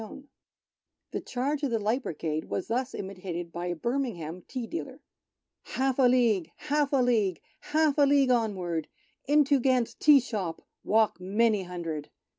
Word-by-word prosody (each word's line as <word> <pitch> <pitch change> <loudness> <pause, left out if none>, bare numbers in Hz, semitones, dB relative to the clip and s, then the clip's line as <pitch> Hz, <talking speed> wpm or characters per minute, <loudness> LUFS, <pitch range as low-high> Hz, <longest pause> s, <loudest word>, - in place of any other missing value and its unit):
whilst 220 +5 -9 0.9
the - - -3
Charge 275 +4 -2
of 285 - 0
the 230 - +1
Light 220 +5 0
Brigade 155 - -3
was 190 - -4
thus 255 +3 -1
imitated 185 -3 -6
by 175 +1 -4
a 175 - -2
Birmingham 185 - -3
tea 250 -3 -4
dealer: 335 +8 -6 0.2
— - - -61
" - - -60
Half 265 0 0
a 260 - +6
League! 230 -9 +3
Half 295 -1 0
a 280 - +3
League! 215 -8 +1 0.2
Half 310 -1 +1
a 285 - +6
League, 275 -2 +4
onward! 185 -9 0 0.4
Into 290 -1 +4
Gant's 255 -2 +1
tea 295 -2 +6
shop 205 -9 -4 0.2
Walk 220 -2 +2
many 210 +2 +2
hundred. 165 -5 -5
230 Hz, 165 wpm, -28 LUFS, 180-270 Hz, 0.9 s, a